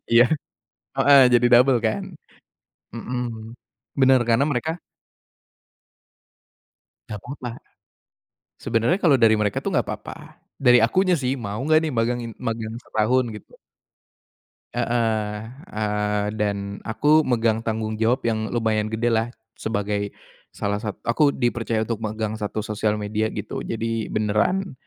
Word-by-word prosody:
Iya, 120 +1 +8 0.7
heeh 140 -1 +7
jadi 120 0 +5
double 125 +1 +6
kan. 110 - 0 0.9
Mhm. 115 -2 -5 0.5
Bener 130 -1 +6
karena 115 +4 +4
mereka 160 +6 -2 2.3
Enggak 105 - -5
apa-apa. 125 -1 -6 1.1
Sebenernya 115 +8 +1
kalo 160 -6 +5
dari 110 -1 +6
mereka 105 -2 0
tuh - - -2
enggak - - +1
apa-apa. - - -6 0.4
Dari 125 -2 +5
akunya 185 +9 +2
sih 125 0 0
mau 105 -4 -5
enggak 155 +3 +4
nih 155 - -1
magangi 120 0 0
magang 115 -2 -3
setahun 120 +4 +1
gitu. 105 - -15 1.2
Heeh, 110 -3 -1 0.3
eee, 105 -1 -1
dan 100 -1 -3
aku 150 +7 +3
megang 115 -2 +2
tanggung 110 -1 -2
jawab 115 +3 +1
yang 110 -1 0
lumayan 110 -2 0
gede 115 +2 0
lah 115 +1 +1 0.2
sebagai 100 -2 -3 0.3
salah 105 0 -3
sat— 105 -2 -5
aku 130 +6 +3
dipercaya 120 -4 -1
untuk 115 -1 -4
megang 110 0 -3
1 105 0 -3
sosial 105 -1 -1
media 105 +1 -1
gitu. 105 -1 -5
Jadi 115 -1 -3
beneran 110 - 0
115 Hz, 125 wpm, -23 LUFS, 105-120 Hz, 2.3 s, Iya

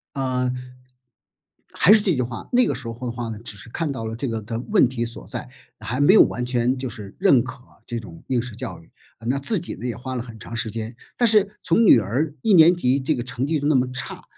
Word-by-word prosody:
呃， 130 -2 0 1.2
还 195 - +5
是 220 - +5
这 195 - +2
句 130 - -1
话， 120 -2 -4
那 250 0 +4
个 - - 0
时 130 - -6
候 115 - -4
的 - - -2
话 120 0 -5
呢， 110 - -6
只 115 -2 -5
是 105 +3 -11
看 160 +4 -2
到 130 -5 -5
了 110 0 -4
这 130 +4 -3
个 115 -1 -3
的 115 +2 -4
问 205 -9 +5
题 120 -1 -3
所 115 0 -6
在， - - -5 0.3
还 125 +2 -4
没 145 +6 +5
有 215 - +9
完 125 - -3
全 125 +1 0
就 130 -1 -4
是 105 -5 -9
认 175 -11 +5
可 130 0 -10 0.2
这 120 - -4
种 90 -7 -11
应 125 -2 +1
试 120 -1 -6
教 - - -6
育。 - - -21 0.4
那 130 +3 +1
自 190 +10 +3
己 175 - -5
呢 125 - -6
也 120 - -3
花 130 +2 -6
了 125 - -3
很 115 -2 -11
长 115 - -9
时 115 -1 -1
间， 115 +2 -5 0.2
但 240 - +3
是 210 -1 +3
从 175 +7 +3
女 130 - +8
儿 130 +9 -1
一 220 - +3
年 175 0 +7
级 135 -4 +2
这 135 +4 0
个 120 - -3
成 125 +1 -3
绩 155 +1 0
就 145 - -3
那 150 - +3
么 130 -1 +2
差， 130 - -3
125 Hz, 280 characters per minute, -22 LUFS, 115-150 Hz, 1.2 s, 有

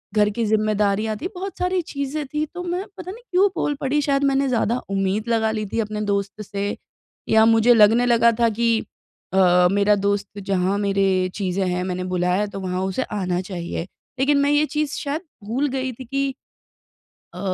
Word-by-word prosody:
घर 210 -1 +4
की 230 +3 -2
ज़िम्मेदारियाँ 215 0 +1
थी 350 - -4
बहुत 385 +2 -6
सारी 360 0 +1
चीज़ें 280 +1 -3
थी 305 +1 0
तो 355 0 -5
मैं 360 +3 -3
पता 365 0 -6
नहीं 470 +4 -12
क्यों 380 +3 +5
बोल 290 - 0
पड़ी 290 +2 +1
शायद 280 -1 +1
मैंने 275 0 +2
ज़्यादा 235 0 +1 0.2
उम्मीद 195 +4 -1
लगा 220 -1 +2
ली 215 -1 -2
थी 230 - -3
अपने 210 0 -4
दोस्त 200 +1 -2
से, 200 0 -3 0.5
या 220 0 +6
मुझे 225 +1 +5
लगने 225 +2 +5
लगा 235 -1 +4
था 230 -1 +4
कि 230 +2 0 0.6
अ, 180 -1 +5
मेरा 205 +1 +3
दोस्त 205 0 -1
जहाँ 190 +1 +1
मेरे 200 -1 +1 0.3
चीज़ें 190 -1 -1
हैं 180 0 -1
मैंने 185 0 -3
बुलाया 180 +3 +1
है 210 - -1
तो 195 - -7
वहाँ 185 0 -2
उसे 260 - -1 0.2
आना 180 -1 -1
चाहिए। 170 -2 -4 0.4
लेकिन 285 +2 +3
मैं 285 +1 +2
ये 295 +1 +3
चीज़ 300 -1 0
शायद 300 +1 -3 0.2
भूल 260 +7 0
गई 260 0 -2
थी 255 +2 -10
कि 275 +3 -1 1.1
अ, - - -8
220 Hz, 190 wpm, -22 LUFS, 200-275 Hz, 1.1 s, या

